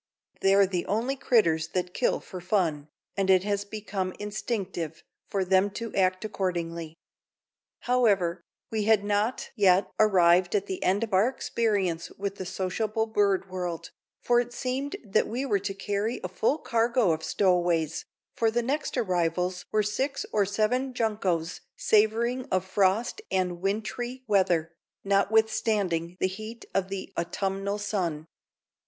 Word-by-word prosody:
They're 195 +1 +5
the 180 -2 -3
only 230 +7 0
critters 170 - +2
that 180 -1 -2
kill - - +1
fer 185 - -9
fun," 175 -6 0 0.3
and 195 -1 0
it 185 -1 +5
has 200 0 -1
become 200 -3 -4
instinctive 200 -6 -4 0.2
for 195 -2 -1
them 190 +2 +3
to 230 -2 -5
act 185 +1 +1
accordingly. 170 -5 -3 0.9
However, 200 -9 +2 0.3
we 215 -2 -1
had 220 -2 +4
not 210 +4 -1
yet 190 -3 +4
arrived 180 -3 +4
at 200 -1 +1
the 190 -2 -5
end 195 +4 +2
of 220 -3 -4
our 190 +5 +5
experience 200 -10 -1
with 200 0 -3
the 185 - -5
sociable 215 +4 -1
bird 200 -3 +1
world, 175 -3 -4 0.3
for 240 0 +4
it 240 0 -3
seemed 260 +3 -3
that 205 +1 +2
we 250 +5 -2
were 205 -7 +1
to 200 +1 -3
carry 205 +4 -2
a - - -1
full 220 - 0
cargo 235 - +2
of 160 0 -1
stowaways, 175 -5 +1 0.3
for 225 - +2
the 235 +2 0
next 280 +3 -2
arrivals 180 -3 0
were 215 0 +2
six 270 +7 -2
or 205 -2 +3
seven 245 +6 0
juncos 190 -8 -1
savoring 230 +4 +2
of 185 0 0
frost 200 - +1
and 180 -2 -1
wintry 220 +6 -3
weather, 180 -6 +2 0.3
notwithstanding 200 -4 +1
the - - +2
heat 215 +5 -6
of 195 -1 0
the 195 -1 -6
autumnal 195 +3 -2
sun. 180 -7 -2
200 Hz, 145 wpm, -27 LUFS, 185-220 Hz, 0.9 s, They're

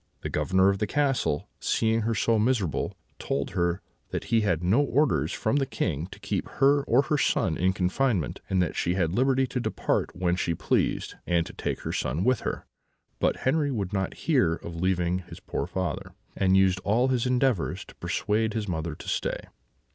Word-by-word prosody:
The - - -4
Governor 95 +1 +3
of 100 0 0
the 105 - 0
castle, 130 - 0
seeing 115 0 +1
her 115 +1 0
so 115 +2 +2
miserable, 105 - 0 0.2
told 70 0 -2
her 85 0 0 0.3
that - - -3
he 115 - +5
had 90 -5 0
no 100 +10 +4
orders 125 - +2
from 110 +6 0
the 135 -2 +1
King 85 - -2
to - - -12
keep - - -2
her 140 +1 +5
or 125 +4 +4
her 150 +1 0
son 80 -10 +1
in 90 +3 +2
confinement, 95 - 0
and 95 -1 +3
that 85 - -3
she 85 - 0
had 85 -3 +1
liberty 130 +3 +3
to 125 - -3
depart - - -1
when 90 -1 +1
she 85 -2 -1
pleased, - - 0
and 85 -1 +2
to - - -9
take - - -3
her - - -4
son 75 +7 -1
with 125 +2 +3
her; - - -4 0.5
but - - +1
Henri 145 +2 +2
would 105 -7 -3
not 95 -2 -1
hear 125 - +3
of 85 0 -8
leaving 90 0 +1
his 90 - -11
poor - - -3
father, 90 0 -4 0.2
and 95 -1 +3
used 95 -1 +4
all 115 +7 +2
his 125 -1 +1
endeavours 125 -6 +1
to - - -14
persuade 110 +1 0
his 110 -2 -2
mother 80 -3 -3
to - - -11
stay. - - -1
95 Hz, 195 wpm, -27 LUFS, 90-125 Hz, 0.5 s, he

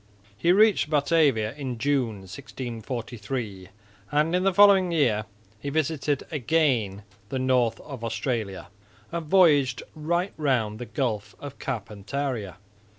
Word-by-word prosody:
He 170 +11 +2
reached 205 -4 +4
Batavia 145 -7 +2
in 135 -4 -5
June, 125 -5 0
1643, 115 0 -6 0.4
and 155 +4 +2
in 180 - +2
the 195 +1 +3
following 195 -1 +6
year 120 -10 +2 0.3
he 140 - -4
visited 150 -1 0
again 125 -9 +1 0.3
the 135 - -2
north 125 -3 +2
of 135 -6 -9
Australia 110 -3 -3 0.4
and 170 -2 -4
voyaged 145 -8 +4
right 170 +5 -1
round 120 -8 0
the 125 - -6
Gulf 115 -8 -2
of 140 -1 -9
Carpentaria. 105 - -4
130 Hz, 120 wpm, -26 LUFS, 110-155 Hz, 0.4 s, following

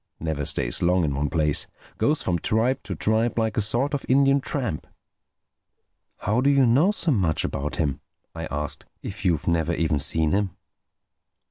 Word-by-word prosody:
Never 80 -3 -3
stays - - 0
long 90 +1 +3
in 75 -3 0
one 70 +1 -1
place. 75 -4 +1 0.3
Goes 150 +1 +1
from 85 -2 0
tribe 115 +9 +1
to 95 - -4
tribe, 110 +7 +1
like 110 -2 0
a - - +1
sort 120 +8 +1
of 145 - -2
Indian 135 +1 +4
tramp." 120 - -3 1.3
"How 110 +5 0
do 140 - +3
you 140 -2 +4
know 135 +11 +4
so 190 -6 +1
much 90 - +1
about 70 +2 -3
him?" 70 -3 -1 0.3
I 80 -1 -5
asked—"if 75 +6 -6
you've 85 -6 0
never 85 0 +1
even 80 -3 0
seen 80 +2 +1
him?" 100 -2 -1
95 Hz, 165 wpm, -24 LUFS, 80-120 Hz, 1.3 s, Indian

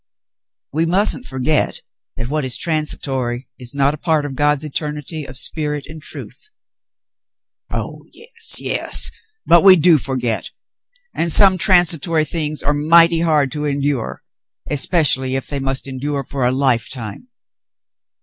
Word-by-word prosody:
"We 160 +3 -1
mustn't 205 +8 +1
forget 130 +4 -1 0.3
that 115 - -6
what 150 +2 -2
is 125 -3 -1
transitory 135 -6 -2
is 125 +1 -7
not 140 +1 +1
a - - -7
part 155 -3 -1
of 140 - -6
God's 145 +1 0
eternity 150 0 -5
of 130 -1 -10
spirit 150 +2 0
and 155 0 -12
truth." 425 - -9 1.2
"Oh, - - -6
yes, 460 -1 +1
yes! - - +2 0.3
But 170 +2 +5
we 190 -1 +8
do 165 -2 +4
forget. 125 -3 -2 0.7
x\nd 170 0 0
some 190 +1 +6
transitory 170 -4 +3
things 155 -2 -4
are 145 - 0
mighty 165 +3 +4
hard 155 -5 +1
to 150 +2 -4
endure, 140 -3 -3 0.5
especially 135 -3 +2
if 135 - -3
they 140 - -4
must 135 0 -3
endure 140 +1 -4
for 130 -1 -2
a - - +1
lifetime." 130 - -2
150 Hz, 140 wpm, -17 LUFS, 135-165 Hz, 1.2 s, we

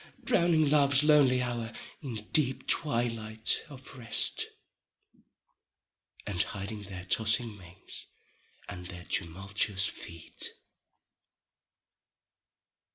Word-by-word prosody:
Drowning 165 -3 +3
love's 140 -1 +5
lonely 140 -4 +4
hour 120 -2 -3 0.3
in 115 -7 -6
deep 135 -5 +4
twilight 115 -6 +1
of 135 -1 -12
rest, 115 -1 +2 1.8
And 95 -4 0
hiding 105 0 -3
their 95 -2 -7
tossing 110 +2 +1
manes 90 -1 -9 0.6
and 90 0 -7
their 90 -1 -9
tumultuous 95 +4 0
feet. 85 -4 -5
110 Hz, 85 wpm, -30 LUFS, 95-135 Hz, 1.8 s, love's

